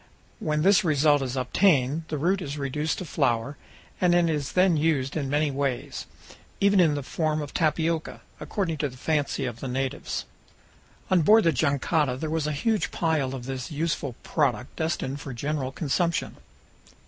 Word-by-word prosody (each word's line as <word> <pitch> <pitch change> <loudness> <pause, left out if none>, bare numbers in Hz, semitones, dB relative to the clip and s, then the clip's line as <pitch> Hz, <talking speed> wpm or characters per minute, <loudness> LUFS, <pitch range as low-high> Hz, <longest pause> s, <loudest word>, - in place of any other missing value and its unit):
When 150 0 0
this 195 -1 +5
result 150 -2 +3
is 130 0 -3
obtained, 150 0 +2
the 155 - -3
root 180 +6 +1
is 145 -2 -5
reduced 150 +3 -2
to 185 - -5
flour, 120 -2 0 0.5
and 175 -1 +4
is 160 -5 +1
then 185 -2 +4
used 150 -4 +1
in 140 -4 -2
many 145 +1 +1
ways, 135 -2 -3 0.5
even 200 0 +4
in 160 -5 +4
the 145 - -3
form 155 +2 -1
of 145 -2 -6
tapioca, 160 0 0 0.2
according 180 -6 -2
to 145 - 0
the 130 - -13
fancy 145 -1 -1
of 120 -2 -5
the 135 - -5
natives. 130 +1 -3 0.9
On 185 -2 +5
board 215 +8 +6
the 165 - +4
jangada 140 -1 +1
there 155 +3 -4
was 160 -2 0
a - - 0
huge 215 +9 0
pile 150 -6 0
of 125 -2 -7
this 130 -2 -5
useful 150 -4 -2
product 130 -5 -1
destined 145 -4 -2
for 135 - -6
general 140 +1 -2
consumption. 165 +4 -1
150 Hz, 170 wpm, -26 LUFS, 135-165 Hz, 0.9 s, board